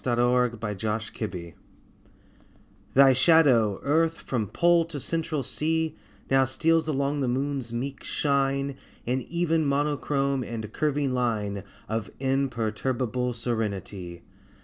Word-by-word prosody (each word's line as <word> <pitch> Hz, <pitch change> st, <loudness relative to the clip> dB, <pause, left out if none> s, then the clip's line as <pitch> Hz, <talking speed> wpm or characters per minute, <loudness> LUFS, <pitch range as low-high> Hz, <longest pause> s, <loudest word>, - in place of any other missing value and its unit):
AT 120 Hz, -2 st, 0 dB
A 120 Hz, -, +4 dB
LUNAR 125 Hz, -1 st, +2 dB, 0.4 s
ECLIPSE 105 Hz, -6 st, -6 dB, 1.4 s
THY 135 Hz, 0 st, +8 dB
shadow, 130 Hz, -, +4 dB
Earth, 165 Hz, +3 st, +2 dB
from 115 Hz, -5 st, -2 dB
Pole 170 Hz, -, +3 dB
to 160 Hz, -3 st, -6 dB
Central 160 Hz, -1 st, -2 dB
Sea, 155 Hz, +6 st, -1 dB, 0.4 s
Now 135 Hz, 0 st, +5 dB
steals 160 Hz, +4 st, +1 dB
along 140 Hz, -1 st, 0 dB
upon -, -, -2 dB
the 135 Hz, -, 0 dB
Moon's 135 Hz, -1 st, -2 dB
meek 130 Hz, +3 st, -4 dB
shine 140 Hz, -1 st, 0 dB, 0.3 s
In 130 Hz, +2 st, 0 dB
even 165 Hz, +2 st, 0 dB
monochrome 140 Hz, -1 st, 0 dB
and 110 Hz, -2 st, -6 dB
curving 145 Hz, -3 st, 0 dB
line 105 Hz, -6 st, -1 dB, 0.2 s
Of 110 Hz, -1 st, -3 dB
imperturbable 125 Hz, -1 st, -1 dB
serenity. 100 Hz, -7 st, -4 dB
130 Hz, 120 wpm, -26 LUFS, 115-145 Hz, 1.4 s, THY